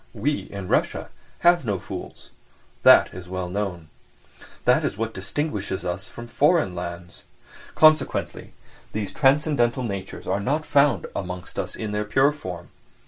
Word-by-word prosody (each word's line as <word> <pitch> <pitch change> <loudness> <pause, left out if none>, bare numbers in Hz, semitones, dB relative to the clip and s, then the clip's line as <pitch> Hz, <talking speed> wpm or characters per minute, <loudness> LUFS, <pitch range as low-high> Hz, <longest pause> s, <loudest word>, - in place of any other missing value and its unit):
We, 145 +8 -1
in 100 -2 -6
Russia, - - 0 0.3
have 175 -2 +5
no 105 -5 -1
fools; - - -9 0.5
that - - +7
is 90 -1 -9
well 95 -1 -3
known. 90 -4 -4 0.8
That - - +4
is - - -2
what 115 0 -2
distinguishes 100 -3 -3
us 90 +2 -3
from 120 - -9
foreign 145 - +2
lands. 85 -1 -7 0.5
Consequently 155 0 +3 0.4
these 105 -2 -3
transcendental 135 -3 +2
natures 100 -4 -5
are 95 +2 0
not 145 +9 -1
found 140 -2 +3
amongst 90 -1 -5
us - - -4
in 110 -2 -4
their 105 0 -1
pure 135 +7 +3
form. 90 - -8
105 Hz, 140 wpm, -24 LUFS, 95-140 Hz, 0.8 s, that